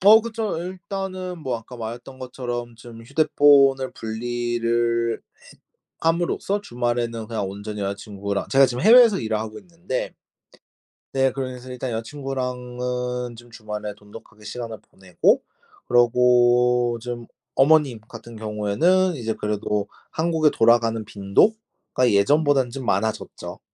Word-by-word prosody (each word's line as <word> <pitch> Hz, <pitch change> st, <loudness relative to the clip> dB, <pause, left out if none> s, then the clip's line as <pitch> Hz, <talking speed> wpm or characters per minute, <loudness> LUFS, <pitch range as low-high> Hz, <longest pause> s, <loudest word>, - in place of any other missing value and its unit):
어 215 Hz, +4 st, +8 dB
그쵸. 220 Hz, -5 st, -3 dB
일단은 185 Hz, 0 st, -5 dB
뭐 130 Hz, -6 st, -2 dB
아까 120 Hz, +2 st, -12 dB
말했던 120 Hz, +3 st, -7 dB
것처럼 120 Hz, -2 st, -5 dB
좀 115 Hz, 0 st, -12 dB
휴대폰을 140 Hz, -1 st, +4 dB
분리를 115 Hz, 0 st, -1 dB
해 -, -, -31 dB, 0.8 s
함으로써 175 Hz, +4 st, 0 dB
주말에는 120 Hz, -, -2 dB
그냥 105 Hz, -4 st, -2 dB
온전히 105 Hz, +1 st, -6 dB
여자 100 Hz, 0 st, -1 dB
친구랑 100 Hz, -1 st, -4 dB
제가 135 Hz, 0 st, +6 dB
지금 125 Hz, +2 st, -4 dB
해외에서 230 Hz, -2 st, +7 dB
일을 110 Hz, -1 st, -1 dB
하고 110 Hz, 0 st, -6 dB
있는데 170 Hz, -7 st, -5 dB, 1.0 s
네 135 Hz, -1 st, +2 dB
그래서 130 Hz, -1 st, -6 dB
일단 125 Hz, +1 st, -4 dB
여자 115 Hz, 0 st, -3 dB
친구랑은 125 Hz, -2 st, -4 dB
좀 120 Hz, +1 st, -14 dB
주말에 105 Hz, -2 st, -6 dB
돈독하게 105 Hz, 0 st, -15 dB
시간을 115 Hz, 0 st, -6 dB
보내고 95 Hz, -2 st, +1 dB, 0.5 s
그러고 120 Hz, 0 st, +4 dB
좀 120 Hz, 0 st, -6 dB, 0.3 s
어머님 140 Hz, -4 st, +4 dB
같은 120 Hz, -1 st, -11 dB
경우에는 110 Hz, -, +1 dB
이제 115 Hz, -5 st, -2 dB
그래도 105 Hz, -1 st, -2 dB, 0.2 s
한국에 160 Hz, -2 st, +2 dB
돌아가는 115 Hz, -1 st, +3 dB
빈도가 125 Hz, -, 0 dB
예전보다는 135 Hz, +5 st, +3 dB
좀 130 Hz, 0 st, -7 dB
많아졌죠. 110 Hz, -1 st, -2 dB
120 Hz, 305 characters per minute, -23 LUFS, 115-140 Hz, 1.0 s, 어